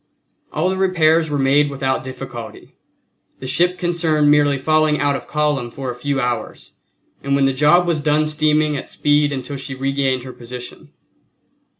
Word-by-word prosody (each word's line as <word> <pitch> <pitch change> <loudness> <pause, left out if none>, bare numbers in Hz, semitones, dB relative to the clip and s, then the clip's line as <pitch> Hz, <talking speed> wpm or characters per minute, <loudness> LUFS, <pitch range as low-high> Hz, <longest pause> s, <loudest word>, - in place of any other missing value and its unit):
All 155 +4 0
the 190 - -3
repairs 165 -4 +2
were 145 - -1
made 140 +2 +3
without 135 -1 -2
difficulty, 130 -3 -9 0.7
the - - -8
ship 175 +7 +1
concerned 160 -4 +1
merely 145 -1 +3
falling 155 +2 +2
out 145 -1 +1
of - - -7
column 150 -5 -1
for 130 +1 -5
a - - -8
few 140 +2 -2
hours, 120 -3 -4 0.5
and 140 0 0
when 140 -1 +3
the 135 - +2
job 150 +6 +4
was 165 -3 0
done 150 +1 +2
steaming 155 0 +1
at 140 - -6
speed 145 0 +1
until 140 +1 -5
she 135 0 -6
regained 135 -1 -1
her 130 0 -9
position. 125 +1 -10
145 Hz, 170 wpm, -19 LUFS, 135-155 Hz, 0.7 s, job